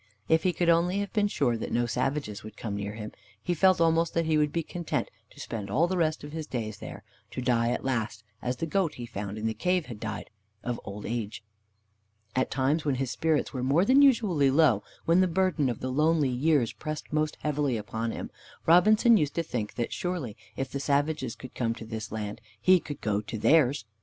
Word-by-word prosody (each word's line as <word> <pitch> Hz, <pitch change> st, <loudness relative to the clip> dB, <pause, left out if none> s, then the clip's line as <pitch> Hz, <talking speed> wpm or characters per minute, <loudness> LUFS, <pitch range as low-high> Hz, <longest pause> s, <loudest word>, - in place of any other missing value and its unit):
If 160 Hz, 0 st, +4 dB
he 185 Hz, -, +2 dB
could 175 Hz, +1 st, -1 dB
only 170 Hz, +3 st, +3 dB
have 200 Hz, 0 st, -3 dB
been 210 Hz, -2 st, +3 dB
sure 135 Hz, -11 st, +1 dB
that 115 Hz, -, -5 dB
no 120 Hz, 0 st, +2 dB
savages 120 Hz, -1 st, -2 dB
would 110 Hz, 0 st, -11 dB
come 105 Hz, -3 st, -4 dB
near 100 Hz, 0 st, -4 dB
him, 105 Hz, -1 st, -6 dB, 0.3 s
he 175 Hz, +12 st, -1 dB
felt 185 Hz, +2 st, +4 dB
almost 165 Hz, 0 st, +2 dB
that 165 Hz, 0 st, +2 dB
he 160 Hz, 0 st, +2 dB
would 150 Hz, -1 st, +2 dB
be 165 Hz, -, -1 dB
content 175 Hz, +1 st, -3 dB, 0.2 s
to -, -, -17 dB
spend 105 Hz, -4 st, -5 dB
all 145 Hz, +11 st, +3 dB
the 185 Hz, -, -1 dB
rest 160 Hz, -4 st, 0 dB
of 145 Hz, -, -8 dB
his 160 Hz, -1 st, -5 dB
days 110 Hz, -4 st, -4 dB
there, -, -, -8 dB, 0.3 s
to -, -, -6 dB
die 120 Hz, -2 st, +2 dB
at 125 Hz, -, -2 dB
last, 110 Hz, -5 st, -2 dB, 0.2 s
as 125 Hz, +1 st, -1 dB
the 165 Hz, -, -2 dB
goat 165 Hz, -1 st, 0 dB
he 120 Hz, -, -6 dB
found 100 Hz, -2 st, -5 dB
in 110 Hz, -, -4 dB
the 110 Hz, -, +1 dB
cave 180 Hz, +4 st, 0 dB
had 115 Hz, -4 st, -8 dB
died, 110 Hz, -1 st, -5 dB, 0.3 s
of 120 Hz, -1 st, -3 dB
old 105 Hz, 0 st, -7 dB
age. 110 Hz, -2 st, -4 dB, 0.9 s
At 130 Hz, -, +1 dB
times, 140 Hz, +4 st, +1 dB
when 145 Hz, -3 st, +1 dB
his 130 Hz, -1 st, -2 dB
spirits 160 Hz, -2 st, 0 dB
were 130 Hz, -, -3 dB
more 140 Hz, +8 st, +3 dB
than 265 Hz, +5 st, +6 dB
usually 210 Hz, -, +4 dB
low, 135 Hz, -7 st, +4 dB, 0.2 s
when 170 Hz, +3 st, +4 dB
the 185 Hz, -, +4 dB
burden 175 Hz, -5 st, +1 dB
of 120 Hz, -, -4 dB
the 130 Hz, -, -2 dB
lonely 155 Hz, +1 st, +3 dB
years 130 Hz, -1 st, +2 dB
pressed 155 Hz, -1 st, -6 dB
most 155 Hz, 0 st, 0 dB
heavily 145 Hz, -4 st, 0 dB
upon 110 Hz, +2 st, -3 dB
him, -, -, -5 dB, 0.3 s
Robinson 215 Hz, +7 st, +6 dB
used 150 Hz, -5 st, 0 dB
to 170 Hz, -, 0 dB
think 115 Hz, -8 st, -4 dB
that 120 Hz, -, -2 dB
surely 175 Hz, -, -3 dB, 0.2 s
if 135 Hz, -1 st, -3 dB
the 140 Hz, -, -3 dB
savages 140 Hz, -3 st, 0 dB
could 130 Hz, -, -11 dB
come 115 Hz, -2 st, -1 dB
to 115 Hz, -, -9 dB
his 110 Hz, -1 st, -6 dB
land, 105 Hz, -1 st, -5 dB, 0.2 s
he 185 Hz, +8 st, +5 dB
could 145 Hz, -3 st, -8 dB
go 105 Hz, -1 st, 0 dB
to 105 Hz, +2 st, -6 dB
theirs. 140 Hz, -3 st, +3 dB
140 Hz, 220 wpm, -28 LUFS, 115-165 Hz, 0.9 s, than